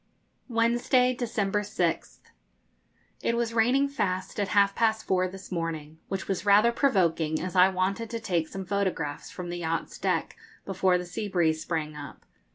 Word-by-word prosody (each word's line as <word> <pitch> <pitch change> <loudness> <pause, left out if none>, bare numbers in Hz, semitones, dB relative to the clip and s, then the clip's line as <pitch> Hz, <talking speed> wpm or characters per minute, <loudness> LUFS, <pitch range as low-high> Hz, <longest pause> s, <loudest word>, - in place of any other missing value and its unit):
Wednesday, 240 +2 +2
December 220 -5 -1
6th. 205 - -2 1.0
It 235 - 0
was 235 -1 -1
raining 250 +5 +3
fast 190 -9 -2
at 200 - +1
half 200 0 +3
past 220 -1 +1
four 185 -1 +2
this 190 +1 -10
morning, 160 -3 -4
which 195 -1 -4
was 190 -2 -2
rather 210 +3 +5
provoking, 170 - +1
as 185 +1 -5
I 185 +1 +7
wanted 195 +4 -1
to 230 - -4
take 175 -7 -1
some 195 +3 -6
photographs 185 -7 -2
from 180 -1 -7
the 175 - -4
yacht's 165 -1 -3
deck - - -1 0.3
before 190 -1 +2
the 180 - -5
sea 205 +4 -4
breeze 160 -5 +1
sprang 155 -3 -3
up. 145 -2 -10
190 Hz, 165 wpm, -27 LUFS, 175-225 Hz, 1.0 s, I